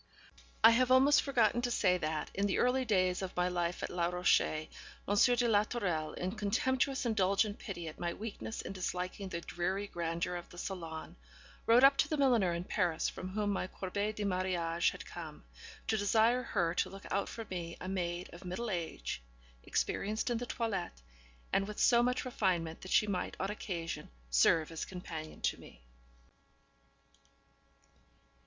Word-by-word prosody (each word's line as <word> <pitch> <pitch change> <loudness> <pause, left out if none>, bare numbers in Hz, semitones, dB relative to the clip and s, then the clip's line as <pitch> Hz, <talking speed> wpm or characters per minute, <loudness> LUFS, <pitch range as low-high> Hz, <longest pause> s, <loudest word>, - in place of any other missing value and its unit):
I 225 - +10
have 250 +2 +3
almost 265 +3 +6
forgotten 240 -4 +2
to 245 - 0
say 185 -6 +2
that, 155 -1 -2
in 200 +1 +1
the 195 - 0
early 255 +1 +2
days 185 -5 +2
of 185 -2 -5
my 180 0 +3
life 175 -1 -1
at - - -3
Les 175 -1 0
Rochers, 175 -3 +2 0.4
M. 205 +5 +5
de 240 0 +2
la 210 -2 +4
Tourelle, 180 -9 -2
in 180 +1 -2
contemptuous 255 +6 0
indulgent 205 -1 +2
pity 175 -5 -6
at 155 - -8
my 175 -1 -1
weakness 220 +2 -6
in - - -5
disliking 185 +1 -3
the 170 -1 -4
dreary 185 +4 -2
grandeur 170 -1 -2
of 175 - -9
the 175 - -13
salon, 170 -2 -6 0.5
wrote 235 +3 +6
up 275 0 +8
to 280 - +3
the 310 - -1
milliner 240 -10 +4
in 170 +1 -2
Paris 175 -4 0
from 185 - -6
whom 205 +1 -1
my 190 -2 -1
corbeille 200 +3 -2
de 210 -1 -4
mariage 180 -3 +1
had - - -8
come, - - -8 0.4
to 220 - +1
desire 220 +4 +3
her 170 -8 0
to - - 0
look 195 0 -11
out 200 +1 0
for 225 - -6
me 170 -2 -4
a 185 - -6
maid 180 -2 -2
of 175 - -11
middle 200 +6 -3
age, 165 - -3 0.4
experienced 215 - -1
in 235 - 0
the 245 - -5
toilette, 200 - -3 0.5
and 195 - +2
with 210 - -6
so 235 -1 +5
much 250 +2 0
refinement 180 -9 -1
that 185 - -8
she 215 - +4
might 200 -3 -2
on 195 +2 -1
occasion 170 -5 -5 0.2
serve 155 - +4
as 165 - -4
companion 165 -4 -7
to - - 0
me. - - -15
190 Hz, 175 wpm, -33 LUFS, 175-225 Hz, 0.5 s, I